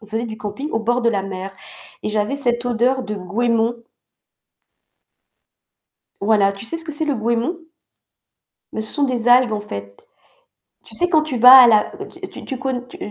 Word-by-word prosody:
on 215 - -15
faisait 220 +2 -3
du 220 -1 -7
camping 215 +9 -6
au 225 - -1
bord 240 +3 0
de 235 - +3
la 200 -3 -1
mer 195 0 -6 0.5
et - - -3
j'avais 210 +5 -1
cette 240 -3 -1
odeur 245 +2 +1
de 210 - -5
goémon. 225 +4 -1 2.5
Voilà, 200 -1 +3
tu 195 +2 -10
sais 330 - -5
ce 325 - -15
que 315 - -6
c'est 305 +2 -3
le 290 - 0
goémon? 235 +8 -1 1.1
Beh, 220 - -3
ce 220 - -9
sont 290 - 0
des 245 -3 -2
algues 245 -1 +5
en 210 - -2
fait. 100 - -8 0.9
Tu - - -16
sais, 355 0 0
quand 315 -3 +3
tu 295 -5 -4
vas 250 +3 +10
à 240 - +7
la 215 -2 +3 0.4
tu - - -11
tu 265 - -5
conn 260 -2 -4
tu, - - -12
235 Hz, 190 wpm, -20 LUFS, 210-255 Hz, 2.5 s, vas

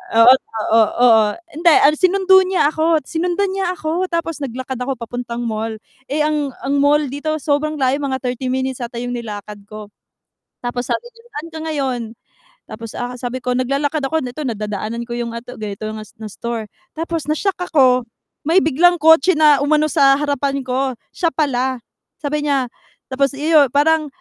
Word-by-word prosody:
oo 230 +2 +8
oo 225 -3 +2 0.2
oo, 225 -3 +6 0.4
hindi, 345 - 0 0.3
sinundo 380 +1 +5
niya 360 -6 +2
ako, 315 -1 +1
sinundan 355 +6 -1
niya 380 -2 -1
ako, 340 +3 -2
tapos 335 -3 -3
naglakad 260 -1 -5
ako 260 +2 -2
papuntang 240 0 -5
mall. 220 -1 -3 0.3
Eh, 300 +2 0
ang 300 -3 -1
ang 275 +1 0
mall 290 +1 +4
dito 310 +3 -2
sobrang 305 +1 -1
layo 270 -1 +1
mga 265 -3 -2
30 250 +1 -3
minutes 260 0 -2
ata 240 -1 -6
yung 245 0 -4
nilakad 210 -2 -7
ko. 215 -1 -10 0.7
Tapos, 245 0 -3
sabi - - -1
niya, 460 0 -20
"Saan 315 +3 -6
ka 320 - -6
ngayon?" 270 -5 -1 0.7
Tapos 225 0 -8
a 245 0 -5
sabi 250 +1 -5
ko 250 - -2
naglalakad 275 +4 0
ako, 320 +4 0
ito 255 +4 -5
nadadaanan 215 0 -3
ko 235 - -11
yung 235 -1 -4
a 230 - -5
ganito 215 -4 -7
na 215 0 -7 0.2
na 215 - -5
store. 230 -1 -5 0.3
Tapos 330 -1 -3
na-shock 380 +5 -1
ako, 255 -4 +4 0.4
may 330 +3 +4
biglang 335 +4 +4
kotse 320 +3 +5
na 300 -2 +6
umano 305 +1 +3
sa 275 0 +5
harapan 280 -1 -1
ko, 260 0 -1 0.2
siya 345 - 0
pala. 260 -4 0 0.4
Sabi 295 +1 -1
niya 275 -3 +1 0.5
tapos 275 0 0
yu 300 0 +4
parang, 310 +1 +3
275 Hz, 170 wpm, -19 LUFS, 245-310 Hz, 0.7 s, oo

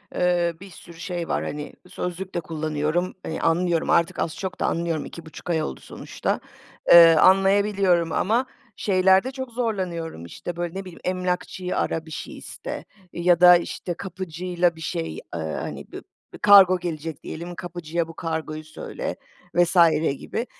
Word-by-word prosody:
eee, 175 -1 +2
bir 195 - -10
sürü 170 0 -14
şey 175 -1 -4
var, - - -1
hani, 150 0 -5 0.2
sözlük 180 +1 -5
de 175 - +1
kullanıyorum, 155 +2 -2
eee, 160 - -4
anlıyorum, 170 0 +1
artık 170 +2 +2
az 160 - -1
çok 185 -3 -5
da - - 0
anlıyorum. 165 -2 -1
2,5 170 +1 -10
ay 160 -2 +1
oldu - - -5
sonuçta. - - -4 0.5
Eee, 165 -1 +10
anlayabiliyorum 195 -2 +4
ama 230 +6 +1 0.3
şeylerde 190 +4 +3
çok 260 -2 -6
zorlanıyorum. 185 - -3
İşte, 165 - -7
böyle, 175 0 -4
ne 195 - -3
bileyim? 180 -2 -11
Emlakçıyı 180 0 -2
ara, 160 0 -1
bir 160 - -12
şey - - -7
iste - - -7 0.3
ya 175 0 +3
da 180 0 +9
işte 175 +1 -5
kapıcıyla 180 -1 -2
bir 160 - -12
şey. 80 - -3
Eee, - - -6 0.2
hani, 80 -1 -4
b - - -7 0.4
b - - -8
kargo 195 -3 +8
gelecek 160 -3 -5
diyelim, 170 +2 -7
kapıcıya 170 -2 -3
bu 165 - -10
kargoyu 160 -2 -4
söyle 155 - -6 0.4
vs. 175 +1 +3 0.4
gibi. 235 - -4
175 Hz, 155 wpm, -24 LUFS, 165-185 Hz, 0.5 s, Eee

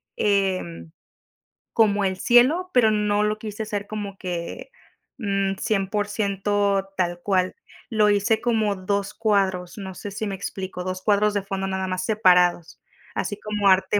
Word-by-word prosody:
em, 185 - 0 0.8
como 205 -2 +3
el 190 -1 -1
cielo, 290 - +4
pero 235 -3 +5
no 210 -1 +1
lo 210 0 0
quise 215 0 -6
hacer 205 -1 -4
como 205 -2 -5
que, 175 - -5 0.5
mm, 195 -3 0
100% 205 -1 0
tal 175 -1 0
cual, 185 -2 +1 0.4
lo 215 -2 +4
hice 205 +2 +2
como 220 -4 +1
2 200 +2 -2
cuadros, 195 -5 0
no 190 -2 -6
sé 205 - -6
si 215 +3 -4
me 200 - -3
explico, 190 -1 -5
2 185 0 -4
cuadros 210 0 +3
de 200 - 0
fondo 195 -1 -3
nada 190 0 -2
más 185 0 -2
separados, 180 -5 +3 0.3
así 205 -1 -3
como 210 -2 +1
arte 190 +2 +3
200 Hz, 150 wpm, -24 LUFS, 190-210 Hz, 0.8 s, pero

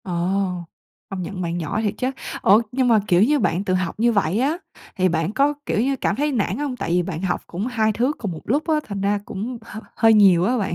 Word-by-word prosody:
Ồ, 185 - -6 1.0
công 195 -1 -4
nhận 185 +1 -5
bạn 170 0 -2
giỏi 165 +7 -2
thiệt 205 -2 0
chớ. 255 +1 -1 0.3
Ủa, 205 +4 +6
nhưng 255 0 +1
mà, 225 -3 +5
kiểu, 180 +2 +4
như 290 +5 +3
bạn 180 -3 0
tự 190 -2 -1
học 185 0 -2
như 235 +1 +3
vậy 200 -2 +1
á 290 +6 +1 0.4
thì 185 0 +2
bạn 165 +1 -1
có, 280 +4 +2
kiểu, - - 0
như 270 +3 +1
cảm 215 - -1
thấy 295 +4 0
nản 230 -7 -1
hông? 285 -3 -3
Tại - - -4
vì 180 +1 +3
bạn 170 -2 -5
học 185 -2 -1
cũng 190 +7 -4
2 220 -3 +1
thứ 245 +6 +1
cùng 205 -5 -4
một 160 - -7
lúc 290 +7 +1
á, 320 - +3
thành 200 -2 -4
ra 200 +1 +1
cũng 230 +5 -5
h 220 - -9 0.2
hơi 225 -1 +5
nhiều 195 -5 +6
á 250 +5 +1
bạn. 195 -5 -2
210 Hz, 255 wpm, -22 LUFS, 185-245 Hz, 1.0 s, Ủa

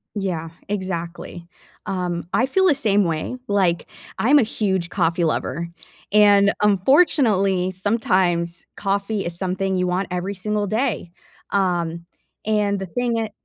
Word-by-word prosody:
Yeah. 175 -5 -3 0.2
Exactly. 175 -3 -5 0.4
Um, 175 -3 -3
I 255 - +3
feel 380 +8 +2
the 295 - +4
same 205 -6 +2
way. 165 +10 -2
Like, 185 -4 +1 0.3
I'm 275 +6 +5
a - - +4
huge 190 -5 -1
coffee 170 -2 0
lover, 165 +1 -1 0.4
and, 205 -1 +6
unfortunately, 200 - +3
sometimes 185 -4 0
coffee 200 0 -1
is 170 0 -5
something 190 0 -1
you 180 0 0
want 180 +2 -1
every 180 +3 -2
single 210 +2 -2
day, 220 -5 -1 0.4
um, 170 -4 0 0.4
and 210 -2 +1
the 190 - -4
thing 240 +5 -1
it 220 -2 -2
195 Hz, 135 wpm, -22 LUFS, 175-210 Hz, 0.4 s, and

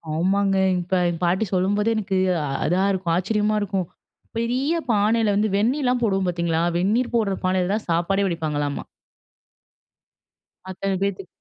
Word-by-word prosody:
ஆமாங்க. 195 +3 +1 0.2
இப்ப 175 +2 -5 0.2
எங்க 165 -1 -4
பாட்டி 185 +5 +2
சொல்லும்போதே, 205 +4 +1
எனக்கு 195 -2 -1 0.5
அதா 180 +5 +2
இருக்கும். 180 -3 -1
ஆச்சரியமா 210 +3 0
இருக்கும். 195 -4 -2 0.5
பெரிய 255 +7 0 0.2
பானையில 215 0 +2
வந்து 215 +1 +1
வெந்நீலா 250 +4 +1
போடுவோம் 195 -3 +1
பார்த்தீங்களா, 170 -1 0 0.2
வெந்நீர் 225 +7 0
போடுற 200 -4 +1
பானையில 185 0 +1
தான் 215 -2 -3
சாப்பாடே 195 +4 +1
வடிப்பாங்களாமா. 150 -4 -2 1.9
அத்தன 190 0 -2
பேத்துக்கு. 195 -2 -3
195 Hz, 125 wpm, -23 LUFS, 180-215 Hz, 1.9 s, பாட்டி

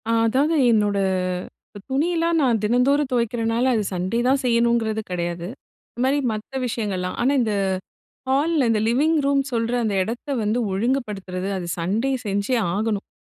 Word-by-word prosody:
அ, - - +2 0.2
அதாவது 280 +8 +2 0.2
என்னோட 205 -2 +2 0.9
துணியெல்லாம் 330 +4 +1
நான் 235 -5 +2
தினந்தோறும் 260 +6 +2
துவைக்கிறனால, 235 0 0
அது 215 - +1
சண்டே 185 +6 -1
தான் 270 +2 +3
செய்யணுங்கிறது 235 -2 +2
கெடையாது. 175 -1 -3 0.4
இந்த 240 - -7
மாரி 280 +2 +2
மத்த 220 +5 -5
விஷயங்கள்லாம் 195 -6 -3
ஆனா, 265 +4 +3
இந்த 220 -3 0 0.8
ஹால்ல 285 +1 +2
இந்த 220 -2 +2
லிவிங் 295 +7 +2
ரூம் 280 0 +3
சொல்ற 230 0 0
அந்த 210 -2 0
எடத்த 230 +8 -5
வந்து 215 +3 0
ஒழுங்குபடுத்துறது 195 -4 -2
அது 180 -2 -4
சண்டே 205 +10 0 0.2
செஞ்சே 205 +5 0 0.2
ஆகணும். 210 0 -1
230 Hz, 140 wpm, -22 LUFS, 205-265 Hz, 0.9 s, தான்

